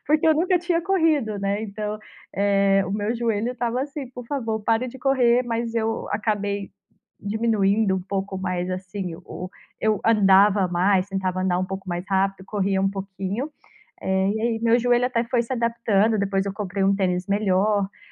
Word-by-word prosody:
Porque 305 Hz, +2 st, +3 dB
eu 315 Hz, -, +6 dB
nunca 355 Hz, +3 st, +2 dB
tinha 345 Hz, -1 st, 0 dB
corrido, 320 Hz, -, +1 dB
né, 200 Hz, +2 st, -1 dB
então, 210 Hz, 0 st, -4 dB, 0.4 s
eh, 195 Hz, 0 st, +3 dB
o 185 Hz, -, -5 dB
meu 210 Hz, +3 st, -1 dB
joelho 230 Hz, 0 st, -1 dB
estava 245 Hz, 0 st, -2 dB
assim: 280 Hz, -2 st, -6 dB
"Por 245 Hz, -1 st, -9 dB
favor, 230 Hz, -5 st, -2 dB
pare 225 Hz, +4 st, +1 dB
de 265 Hz, +2 st, -10 dB
correr". 250 Hz, -2 st, +3 dB
Mas 230 Hz, -1 st, -2 dB
eu 225 Hz, 0 st, -1 dB
acabei 205 Hz, -2 st, -2 dB, 0.5 s
diminuindo 210 Hz, -1 st, +1 dB
um 190 Hz, -, -2 dB
pouco 195 Hz, +1 st, -3 dB
mais, 185 Hz, -1 st, -2 dB
assim, 185 Hz, -1 st, -5 dB
o 180 Hz, -, -7 dB, 0.3 s
eu 215 Hz, -2 st, +1 dB
andava 200 Hz, -2 st, +5 dB
mais, 185 Hz, +2 st, +2 dB
tentava 185 Hz, -1 st, -2 dB
andar 180 Hz, -1 st, +1 dB
um -, -, 0 dB
pouco 190 Hz, 0 st, -7 dB
mais 175 Hz, 0 st, -3 dB
rápido, 195 Hz, 0 st, 0 dB
corria 195 Hz, -1 st, 0 dB
um 195 Hz, -, +2 dB
pouquinho. 195 Hz, +5 st, -4 dB, 0.5 s
Eh, 190 Hz, 0 st, +1 dB
e 220 Hz, -, -2 dB
aí 230 Hz, -1 st, 0 dB
meu 230 Hz, 0 st, +4 dB
joelho 245 Hz, 0 st, +2 dB
até 235 Hz, -2 st, 0 dB
foi 240 Hz, 0 st, +1 dB
se 235 Hz, -, -8 dB
adaptando. 230 Hz, -3 st, +1 dB
Depois 195 Hz, -1 st, 0 dB
eu 200 Hz, -, -3 dB
comprei 200 Hz, -1 st, -3 dB
um 195 Hz, +1 st, +3 dB
tênis 180 Hz, -2 st, 0 dB
melhor. 200 Hz, 0 st, +2 dB
Eh, -, -, -28 dB
205 Hz, 180 wpm, -23 LUFS, 195-235 Hz, 0.5 s, eu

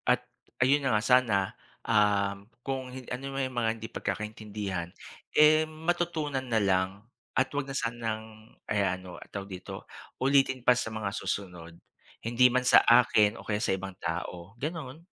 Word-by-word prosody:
At, -, -, +3 dB, 0.4 s
ayun 140 Hz, +3 st, +4 dB
na 115 Hz, -5 st, +3 dB
nga 105 Hz, -, -1 dB
sana, 125 Hz, -4 st, +4 dB, 0.5 s
um, 100 Hz, -2 st, +2 dB, 0.2 s
kung 130 Hz, -1 st, -3 dB
hin 130 Hz, -1 st, -8 dB
ano 135 Hz, +2 st, -5 dB
man 135 Hz, 0 st, 0 dB
'yong 130 Hz, -1 st, -7 dB
mga 115 Hz, -2 st, +2 dB
hindi 115 Hz, 0 st, -7 dB
pagkakaintindihan, 105 Hz, -4 st, -4 dB, 0.5 s
eh, 155 Hz, +1 st, +7 dB
matutunan 155 Hz, -3 st, -2 dB
na 115 Hz, -3 st, +1 dB
lang 95 Hz, -1 st, +2 dB, 0.5 s
at 130 Hz, 0 st, +3 dB
'wag 140 Hz, -1 st, -2 dB
na 135 Hz, -, -2 dB
sanang, 110 Hz, -2 st, -4 dB, 0.2 s
eh, 100 Hz, -2 st, +2 dB
ano 90 Hz, 0 st, -4 dB
tawag 100 Hz, 0 st, -6 dB
dito, 95 Hz, -1 st, -8 dB, 0.4 s
ulitin 135 Hz, -1 st, +3 dB
pa 125 Hz, -, +7 dB
sa 125 Hz, -, -2 dB
mga 110 Hz, -2 st, -2 dB
susunod. 90 Hz, -4 st, -4 dB, 0.5 s
Hindi 120 Hz, +2 st, +4 dB
man 130 Hz, -, +3 dB
sa -, -, +8 dB
akin 110 Hz, -3 st, +5 dB
o -, -, -9 dB
kaya 105 Hz, -, 0 dB
sa 115 Hz, -, +1 dB
ibang 95 Hz, -1 st, -5 dB
tao, 85 Hz, +2 st, -5 dB
gano'n. 155 Hz, -1 st, -5 dB
115 Hz, 160 wpm, -29 LUFS, 100-130 Hz, 0.5 s, sa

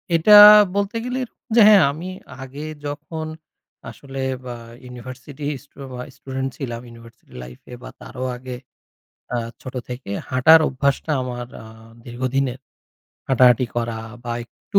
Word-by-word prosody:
এটা 205 Hz, +6 st, +7 dB, 0.4 s
বলতে 200 Hz, +2 st, -1 dB
গেলের 250 Hz, 0 st, -3 dB, 0.3 s
যে 235 Hz, -, +7 dB
হ্যাঁ 205 Hz, -3 st, +7 dB
আমি 170 Hz, +5 st, -7 dB, 0.3 s
আগে 140 Hz, +4 st, -8 dB, 0.2 s
যখন 155 Hz, +2 st, -5 dB, 0.6 s
আসলে 135 Hz, -1 st, -8 dB, 0.2 s
বা 120 Hz, -1 st, -6 dB, 0.3 s
ইউনিভার্সিটি 130 Hz, +4 st, -9 dB, 0.2 s
স্টু 145 Hz, -, -29 dB, 0.2 s
বা 125 Hz, -, -6 dB
স্টুডেন্ট 135 Hz, 0 st, -4 dB
ছিলাম 120 Hz, -4 st, -5 dB
ইউনিভার্সিটি 115 Hz, 0 st, -17 dB
লাইফ 60 Hz, 0 st, -12 dB
এ -, -, -6 dB
বা -, -, -8 dB
তারও 130 Hz, 0 st, -6 dB
আগে 125 Hz, 0 st, -7 dB, 0.8 s
আ -, -, +1 dB, 0.3 s
ছোট 130 Hz, 0 st, -9 dB
থেকে 125 Hz, -4 st, -7 dB, 0.2 s
হাঁটার 155 Hz, +6 st, +6 dB
অভ্যাসটা 140 Hz, +3 st, -1 dB
আমার 120 Hz, -1 st, -5 dB, 0.2 s
আ -, -, -12 dB, 0.4 s
দীর্ঘদিনের। 130 Hz, +1 st, -2 dB, 0.7 s
হাঁটাহাঁটি 125 Hz, -1 st, +5 dB
করা 115 Hz, -1 st, -2 dB, 0.3 s
বা 120 Hz, -, -3 dB
একটু 200 Hz, -, -2 dB
130 Hz, 135 wpm, -21 LUFS, 125-150 Hz, 0.8 s, এটা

